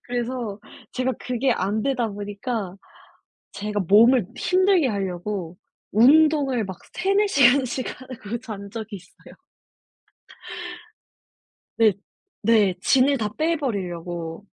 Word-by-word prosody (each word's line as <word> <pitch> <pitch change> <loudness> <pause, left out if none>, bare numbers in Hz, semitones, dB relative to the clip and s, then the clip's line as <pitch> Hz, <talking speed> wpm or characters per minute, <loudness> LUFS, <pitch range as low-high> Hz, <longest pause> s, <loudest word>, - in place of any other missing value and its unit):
그래서 240 -3 -4 0.3
제가 255 +1 -1
그게 250 +1 0
안 205 +3 -1
되다 250 -4 0
보니까 205 -1 -5 0.8
제가 210 0 -3
몸을 225 +1 +5
힘들게 370 -4 +3
하려고 190 -3 -4 0.3
운동을 275 0 +4
막 190 -2 -7 0.2
3-4 395 +3 +2
시간씩 260 -4 +3
하고 235 -3 -6
잔 205 -5 -8
적이 220 -1 -7
있어요. 180 0 -18 2.4
네. 220 -3 +5 0.5
네. 210 -4 +4
진을 270 +6 +3
다 215 - -1
빼 325 +2 +1
버리려고. 175 - -4
230 Hz, 200 characters per minute, -23 LUFS, 200-260 Hz, 2.4 s, 몸을